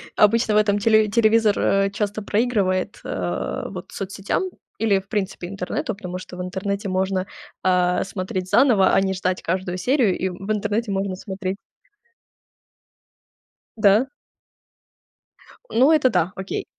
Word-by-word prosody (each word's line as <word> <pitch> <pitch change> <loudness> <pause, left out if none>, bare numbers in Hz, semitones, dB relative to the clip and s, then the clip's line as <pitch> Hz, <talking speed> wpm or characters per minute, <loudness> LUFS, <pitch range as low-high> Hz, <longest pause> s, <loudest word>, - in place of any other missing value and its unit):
обычно 220 +1 +4
в - - +5
этом 205 -1 +3
телеви 215 0 +4
телевизор, 220 -2 +4
а, 195 0 +2
часто 210 0 -2
проигрывает, 205 -4 0
э, 90 -1 -3
вот - - -8
соцсетям 195 - -3 0.4
или 210 -3 +3
в 190 - -16
принципе 190 -3 -3
интернету, 195 +3 -3
потому 180 -2 -6
что 185 0 -10
в - - -4
интернете 200 +2 -3
можно, 190 0 -1 0.4
а, 180 -1 +2
смотреть 185 -1 -4
заново, 225 -7 +4
а - - +4
не 190 0 0
ждать 185 0 -2
каждую 185 +1 -2
серию. 245 -2 +2
И 190 - -1
в 195 +3 -5
интернете 210 +2 -1
можно 195 -1 -1
смотреть 190 0 -5 2.2
Да. 215 +5 +4 1.6
Ну, 260 +6 +5
это 300 -5 +4
да, 185 -5 0
окей. 190 0 -4
195 Hz, 135 wpm, -22 LUFS, 185-215 Hz, 2.2 s, в